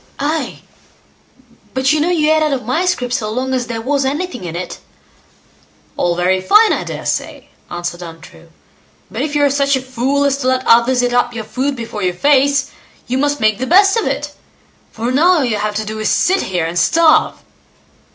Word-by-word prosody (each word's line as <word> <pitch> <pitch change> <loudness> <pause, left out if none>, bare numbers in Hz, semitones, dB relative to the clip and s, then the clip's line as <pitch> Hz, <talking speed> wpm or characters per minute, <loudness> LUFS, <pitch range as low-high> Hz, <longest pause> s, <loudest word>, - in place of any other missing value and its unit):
"Nay! 305 +3 -3 1.1
but 265 +2 +2
you 310 - +1
know 330 - +1
you 310 -3 +2
ate 315 - +2
out 305 -2 +1
of 255 -3 -4
my 260 +10 0
scrip 250 -9 -1
so 215 -4 -2
long 255 +4 -2
as 250 -2 -1
there 230 -1 -4
was 275 +2 0
anything 290 - -3
in 170 -1 -6
it", 180 +1 -5
said - - -13
True. - - -34 0.3
"All 175 -1 0
very 185 +2 +1
fine, 425 - +5
I - - -2
daresay", - - -4 0.2
answered 175 0 -5
Untrue; 165 -1 -12 0.6
"but - - -4
if 295 -1 -3
you 290 - +2
are 285 - +4
such 280 0 +2
a - - -1
fool 260 +2 -1
as 275 -1 +1
to 255 - -2
let 260 0 0
others 245 +2 +4
eat 245 0 0
up 245 -1 +1
your 225 - -4
food 270 +5 -2
before 230 -3 -6
your 180 -2 -1
face, 280 +4 +2 0.3
you 255 +1 -2
must 290 +1 0
make 215 -2 +1
the 260 - -3
best 390 - +5
of 455 - 0
it; - - -3 0.6
for 235 +2 -3
now 330 +8 +4
all 310 -7 +1
you 225 -3 -1
have 210 0 -3
to 215 +1 -2
do 215 +1 -6
is 215 - -1
to - - +2
sit 380 +2 +2
here 175 -3 -1
and 170 +2 -2
starve." 320 -1 +3
260 Hz, 215 wpm, -16 LUFS, 215-290 Hz, 1.1 s, fine